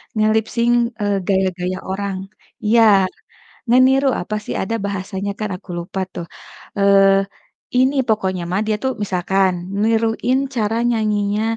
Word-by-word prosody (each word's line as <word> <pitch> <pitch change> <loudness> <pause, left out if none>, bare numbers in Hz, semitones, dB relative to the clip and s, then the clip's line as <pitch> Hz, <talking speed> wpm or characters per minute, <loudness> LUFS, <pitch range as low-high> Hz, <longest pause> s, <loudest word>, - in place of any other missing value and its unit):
nge-lip 215 0 +2
sync, 235 0 +3 0.3
eee, 205 -1 +1
gaya-gaya 185 -2 0
orang. 195 0 -3 0.5
Iya, 230 +2 +4 0.9
ngeniru 260 +3 +4
apa 195 +4 -4
sih - - -4
ada 210 +4 -2
bahasanya 195 0 -4
kan 215 -1 -2
aku 185 - -16
lupa 180 +3 -5
tuh, 170 - -6 0.5
eee, 200 0 +5 0.7
ini 260 +2 +3
pokoknya 190 -4 0
mah 185 +3 0
dia 215 -1 +1
tuh 260 - +1
misalkan 190 0 +1 0.3
niruin 225 +3 +1 0.2
cara 220 0 0
nyanyinya 210 -2 0
205 Hz, 130 wpm, -19 LUFS, 190-225 Hz, 0.9 s, eee